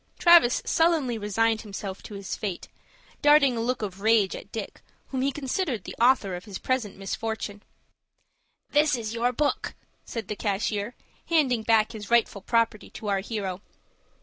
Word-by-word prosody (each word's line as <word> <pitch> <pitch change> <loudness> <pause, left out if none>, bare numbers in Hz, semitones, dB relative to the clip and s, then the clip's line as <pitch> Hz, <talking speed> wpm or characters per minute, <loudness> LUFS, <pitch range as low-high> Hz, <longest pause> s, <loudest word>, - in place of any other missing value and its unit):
Travis 340 -8 +6
sullenly 315 -8 +2
resigned 220 +2 +1
himself 200 -2 -6
to 210 - -9
his 200 -1 -5
fate, 195 -4 -5 0.5
darting 290 -3 +5
a 230 - -2
look 245 0 -1
of 195 -1 -5
rage 220 -3 +3
at 200 - -10
Dick, 220 -3 -6 0.3
whom 260 -2 -2
he 275 +1 +1
considered 270 - -2
the - - -8
author 235 -7 +4
of 175 - -8
his 200 -3 -6
present 250 -7 -2
misfortune. 205 +1 -4 1.1
"This 295 -1 +4
is 225 -2 -4
your 235 +1 +1
book," 290 +4 -1 0.3
said 225 -4 -6
the 210 - -3
cashier, 210 +2 -2 0.3
handing 275 -8 +2
back 220 -1 +3
his 215 -3 -8
rightful 235 -4 +2
property 230 0 0
to 210 - -6
our 195 -1 +2
hero. 195 -3 -4
225 Hz, 160 wpm, -26 LUFS, 205-255 Hz, 1.1 s, Travis